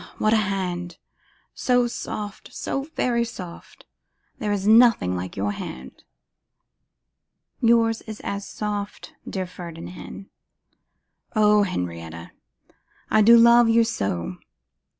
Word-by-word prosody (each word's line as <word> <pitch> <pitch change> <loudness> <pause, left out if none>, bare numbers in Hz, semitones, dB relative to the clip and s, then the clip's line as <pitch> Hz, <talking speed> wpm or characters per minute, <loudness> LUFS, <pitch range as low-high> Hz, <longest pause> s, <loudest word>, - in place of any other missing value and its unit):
what 215 +1 +2
a - - +5
hand! 185 -4 -2 0.6
so 245 -1 +2
soft, 210 -3 -6
so 275 - -3
very 235 -1 +1
soft! 180 -7 -10 0.5
There 215 -5 -1
is 200 -1 -1
nothing 220 - +5
like 90 +2 -5
your 100 +1 0
hand.' 65 -9 -8 1.6
'Yours 230 -1 +3
is 215 -1 -7
as 200 0 -4
soft, 205 0 -5 0.2
dear 190 -1 -3
Ferdinand.' 175 +2 -9 1.1
'O 210 -1 +5
Henrietta! 85 - -4 0.8
I 215 - +5
do 230 +3 +8
love 235 0 +6
you 230 0 +5
so! 95 - -3
205 Hz, 110 wpm, -24 LUFS, 170-225 Hz, 1.6 s, do